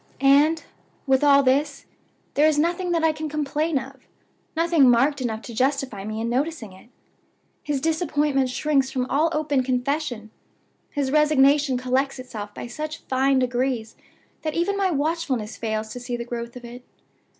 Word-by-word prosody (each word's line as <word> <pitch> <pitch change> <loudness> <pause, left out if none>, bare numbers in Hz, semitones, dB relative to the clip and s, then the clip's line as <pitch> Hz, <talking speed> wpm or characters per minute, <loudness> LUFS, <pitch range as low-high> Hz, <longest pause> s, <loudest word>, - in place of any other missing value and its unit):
"And, 290 +4 +4 0.4
with 265 +1 +2
all 280 -1 +6
this, 275 +3 +1 0.5
there 300 +2 +4
is 310 -1 +2
nothing 345 +4 0
that 335 -2 +1
I 320 - +4
can 310 0 -5
complain 300 +1 -1
of 265 0 -8 0.5
nothing 330 -5 +4
marked 270 +4 +3
enough 225 -3 -3
to 235 - -8
justify 260 -4 -1
me 215 +1 -4
in 230 - -2
noticing 255 - -2
it. 190 +5 -17 0.7
His 295 -2 -2
disappointment 295 -3 0
shrinks 275 0 +1
from 260 -2 -1
all 305 +5 +3
open 300 -4 0
confession; 250 -3 -2 0.6
his 280 -3 -2
resignation 290 -2 +4
collects 260 +2 0
itself 220 -5 -7
by - - -7
such 305 +6 -6
fine 265 +1 +1
degrees 250 -2 -1 0.5
that 310 -2 -3
even 350 +4 0
my 395 -1 +1
watchfulness 285 -8 -1
fails 220 -1 -3
to 245 - -7
see 245 0 -4
the 235 - -5
growth 235 0 -6
of 245 -1 -9
it. 245 +1 -10
275 Hz, 160 wpm, -24 LUFS, 245-305 Hz, 0.7 s, all